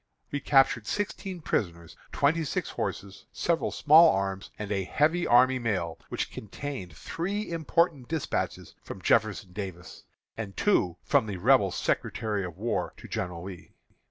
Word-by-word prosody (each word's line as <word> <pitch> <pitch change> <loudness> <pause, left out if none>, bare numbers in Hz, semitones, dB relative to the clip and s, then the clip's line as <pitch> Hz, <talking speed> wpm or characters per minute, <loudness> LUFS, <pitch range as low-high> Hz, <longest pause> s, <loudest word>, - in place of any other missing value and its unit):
We 145 - -1
captured 130 -7 +3
sixteen 195 -3 -3
prisoners, 85 - -2 0.2
twenty 160 +4 +2
six 145 - -2
horses, 100 0 -5
several 170 -1 0
small 160 +3 +7
arms, 95 0 -2
and 105 -1 -5
a 100 -2 0
heavy 160 - +1
army 130 +2 +5
mail, 95 -8 -2
which - - -3
contained 105 - -7
three 195 - -3
important 165 -4 +1
despatches 160 -3 -3
from 95 - -9
Jeff. 110 +3 +4 0.3
Davis, 95 -3 -7 0.3
and 105 -3 -6
two 90 - +2
from 110 - +2
the 100 -3 -4
Rebel 105 0 +4
Secretary 105 +3 -1
of 90 -2 -7
War 115 +4 -2
to - - -11
General 90 -2 -4
Lee. 90 -3 -10
110 Hz, 145 wpm, -28 LUFS, 95-155 Hz, 0.3 s, small